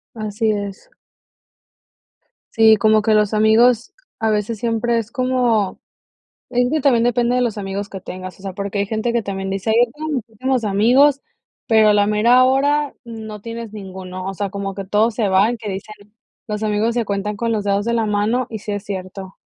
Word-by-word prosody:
Así 215 0 -1
es. 205 - -5 1.6
Sí, 220 -1 +6
como 215 +1 +3
que 220 0 +2
los 210 0 +2
amigos, 230 - +3 0.2
a 220 -1 0
veces 215 +2 -1
siempre 235 +1 0
es 230 0 -3
como 250 -6 0 0.7
es 245 0 +1
que 310 - +1
también 245 -4 +3
depende 245 0 +1
de 250 - +2
los 230 -4 -1
amigos 200 0 -4
que 195 - -7
tengas, 185 -1 -8
o - - -15
sea, 195 -2 -6
porque 200 +1 -4
hay 200 - 0
gente 220 +3 -2
que 235 -1 0
también 195 -1 -4
dice: 195 +2 -3
"Ay, 220 - +3
yo 235 - -19
tengo 310 +1 -5
muchísimos 250 0 -2
amigos", 250 +8 +4 0.5
pero 220 -2 +5
a - - +4
la 205 0 +3
mera 230 +4 +4
hora 285 +3 +1
no 220 -3 -8
tienes 230 -1 -7
ninguno, 185 -2 -8
o 195 - -3
sea, 200 +1 -3
como 195 0 -5
que 195 -1 -6
todos 215 +3 +2
se 215 -3 0
van. 200 +5 +2
Que 215 - -7
dicen, 195 +2 -6 0.5
los 210 0 -3
amigos 215 +2 0
se 240 -1 0
cuentan 205 0 -3
con 230 +2 -1
los 210 -2 -1
dedos 200 0 0
de 235 - -1
la 230 -2 +1
mano, 215 +4 0
y 220 -2 -6
sí 210 - -5
es 205 -1 -3
cierto. 190 -1 -7
215 Hz, 200 wpm, -19 LUFS, 200-235 Hz, 1.6 s, Sí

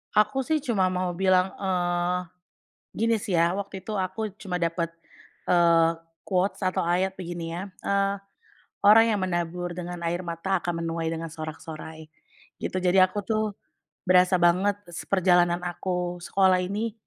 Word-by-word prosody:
Aku 215 +5 +3
sih 310 -3 +1
cuma 210 -9 +2
mau 185 0 -1
bilang, 185 +1 +2
eee, 180 -1 0 0.7
gini 230 +1 +1
sih 200 -2 -4
ya. 170 +3 +2
Waktu 200 -1 -5
itu 215 +3 -5
aku 190 +3 -2
cuma 180 -4 -4
dapet, 170 0 -1 0.6
eee, 170 -2 +5 0.4
quotes 190 +1 0
atau 185 -1 0
ayat 185 +2 +1
begini 170 -2 -5
ya, 175 - -4 0.2
"Eee, 200 0 +1 0.7
orang 225 +2 +8
yang 205 - 0
menabur 175 0 -2
dengan 175 0 -6
air 175 +2 -1
mata 175 +2 -2
akan 170 -1 -3
menuai 165 0 -2
dengan 165 0 -4
sorak-sorai." 155 0 -8 0.6
Gitu. 185 - -2
Jadi 185 +1 +4
aku 185 +3 +3
tuh 215 +1 0 0.6
berasa 185 0 +5
banget 185 +4 +3
s 170 - -7
perjalanan 175 -2 +3
aku 175 0 -3
sekolah 190 0 +3
ini, 205 +5 -2
180 Hz, 150 wpm, -26 LUFS, 170-195 Hz, 0.7 s, orang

